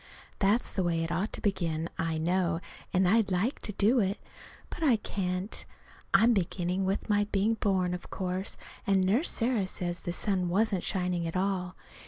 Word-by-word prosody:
That's 210 +5 +2
the 195 - -1
way 165 -1 +1
it 165 - -3
ought 185 +6 -1
to - - -4
begin, 170 -5 0
I 165 -1 0
know, 170 +1 +1 0.3
and 185 0 +3
I'd 220 +1 +4
like 195 +8 0
to - - -4
do 215 +6 +3
it, 195 -1 +1 0.5
but - - -7
I 280 -7 +5
can't. 185 -2 -3 0.5
I'm 225 +5 +6
beginning 185 -1 0
with 195 +2 -1
my 205 -1 +3
being 205 +3 +2
born, 190 -5 +1
of 180 - -6
course, 185 +1 -3 0.3
and 195 -1 +4
Nurse 220 - +3
Sarah 230 -5 0
says 175 -1 -3
the 175 - -4
sun 185 -1 0
wasn't 195 0 +1
shining 180 -3 0
at 165 - -2
all. 185 -1 -1
190 Hz, 180 wpm, -30 LUFS, 180-205 Hz, 0.5 s, I'm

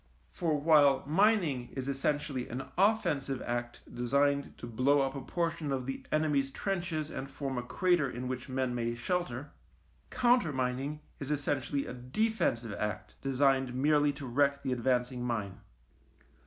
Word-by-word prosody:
For 155 -4 0
while 145 -3 +5
mining 160 - +2
is 130 -1 -4
essentially 140 -1 -1
an 130 +3 -4
offensive 160 - +2
act 120 0 -3
designed 140 +3 +1
to - - -7
blow 130 +5 +3
up 135 0 0
a 140 - -5
portion 165 +1 -2
of 130 -2 -1
the 135 +1 -4
enemy's 150 -3 +2
trenches 170 -2 -2
and 135 - -5
form 135 -1 -4
a 125 - -1
crater 170 +3 +1
in 125 0 -5
which 130 +1 -4
men 130 -1 -1
may 120 -1 -1
shelter, 140 0 -2 0.6
countermining 150 - +1 0.2
is 140 - -5
essentially 145 -1 -1
a - - -6
defensive 125 - -1
act 105 0 -3
designed 135 -1 +2
merely 145 +2 +3
to 140 0 -8
wreck 140 +2 +1
the 135 - -1
advancing 125 0 0
mine. 110 -6 -3
135 Hz, 145 wpm, -31 LUFS, 125-150 Hz, 0.6 s, while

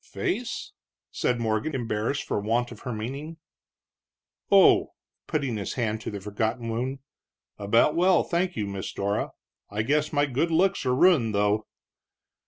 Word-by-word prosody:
"Face?" - - -3 0.4
said 120 -1 0
Morgan, 110 +6 -1
embarrassed 115 +2 -1
for - - -2
want 115 +4 0
of 115 - -10
her 125 - -5
meaning. 135 +9 -5 1.1
"Oh," - - +5 0.3
putting 125 -5 -1
his 100 - -4
hand 110 -3 -1
to - - -4
the 105 - -5
forgotten 110 +4 -2
wound 130 +4 -3 0.6
"about 115 +9 +3
well, 180 +1 +4
thank 175 +1 -1
you, 105 - -1
Miss 100 -1 -5
Dora. 100 +1 -1 0.4
I 105 +2 -2
guess 150 +5 +1
my 145 -1 +2
good 145 +5 0
looks 180 -2 +2
are 125 - +3
ruined, 130 - +4
though." 105 +1 +1
120 Hz, 150 wpm, -26 LUFS, 105-145 Hz, 1.1 s, Oh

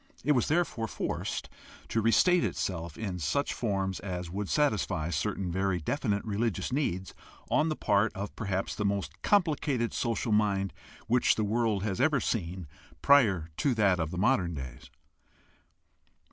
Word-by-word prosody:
It 150 - +2
was 125 -5 +2
therefore 155 -8 0
forced - - -3 0.4
to 115 - +1
restate 175 - +4
itself 85 -4 -3
in 95 -5 -4
such 85 - 0
forms 95 -4 -1
as 90 -3 -5
would 100 +1 -3
satisfy 105 - +1
certain 85 +4 -2
very 95 0 0
definite 105 - -1
religious 110 +1 -1
needs 95 -10 -1 0.4
on 155 - +3
the 155 - -1
part 105 -2 +2
of 100 +1 -5
perhaps 95 -3 -2
the 105 - -3
most 100 -1 -2
complicated 145 - +1
social 115 -1 -1
mind 100 -3 +1 0.3
which 120 +2 +3
the 110 - 0
world 110 -2 0
has 105 +2 -1
ever 145 -1 +3
seen 90 -6 -2 0.4
prior 105 - +4
to 135 -4 +1
that 100 -5 +3
of 80 +2 -2
modern 95 -5 +2
days. 65 -3 -8
105 Hz, 145 wpm, -29 LUFS, 95-120 Hz, 0.4 s, restate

